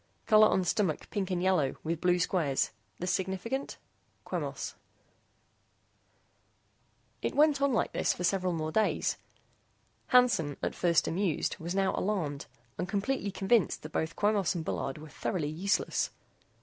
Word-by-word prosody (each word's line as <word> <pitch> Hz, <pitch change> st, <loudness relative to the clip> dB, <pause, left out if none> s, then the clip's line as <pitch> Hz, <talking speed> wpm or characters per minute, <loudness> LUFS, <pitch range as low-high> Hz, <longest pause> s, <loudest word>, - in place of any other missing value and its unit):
COLOR 215 Hz, 0 st, +7 dB
ON 190 Hz, -, +2 dB
STOMACH 180 Hz, -3 st, -1 dB
PINK 195 Hz, -2 st, -2 dB
AND 180 Hz, -1 st, -1 dB
YELLOW 180 Hz, -8 st, +2 dB
WITH 165 Hz, 0 st, -2 dB
BLUE 180 Hz, 0 st, +3 dB
SQUARES. 165 Hz, -6 st, +1 dB, 0.3 s
THIS 180 Hz, +1 st, -1 dB
SIGNIFICANT? 190 Hz, +9 st, -2 dB, 0.5 s
QUEMOS -, -, -4 dB, 2.5 s
It -, -, -2 dB
went 295 Hz, -1 st, +4 dB
on 280 Hz, 0 st, +3 dB
like 235 Hz, -, +1 dB
this -, -, +1 dB
for 180 Hz, -, -4 dB
several 185 Hz, 0 st, +1 dB
more 160 Hz, -2 st, -2 dB
days. 215 Hz, +5 st, +1 dB, 0.9 s
Hansen, 240 Hz, -, +3 dB
at -, -, 0 dB
first 170 Hz, -2 st, +2 dB
amused, 175 Hz, -2 st, 0 dB
was 170 Hz, +3 st, -4 dB
now 195 Hz, -1 st, +2 dB
alarmed 165 Hz, -9 st, -2 dB, 0.3 s
and 180 Hz, -, -2 dB
completely 205 Hz, +2 st, -1 dB
convinced 195 Hz, 0 st, +1 dB
that 155 Hz, -, -8 dB
both 160 Hz, +1 st, -2 dB
Quemos 205 Hz, -3 st, +1 dB
and 165 Hz, -2 st, -3 dB
Bullard 135 Hz, -2 st, -3 dB
were 155 Hz, +1 st, -10 dB
thoroughly 150 Hz, +1 st, -2 dB
useless. 185 Hz, +6 st, 0 dB
185 Hz, 140 wpm, -30 LUFS, 160-205 Hz, 2.5 s, COLOR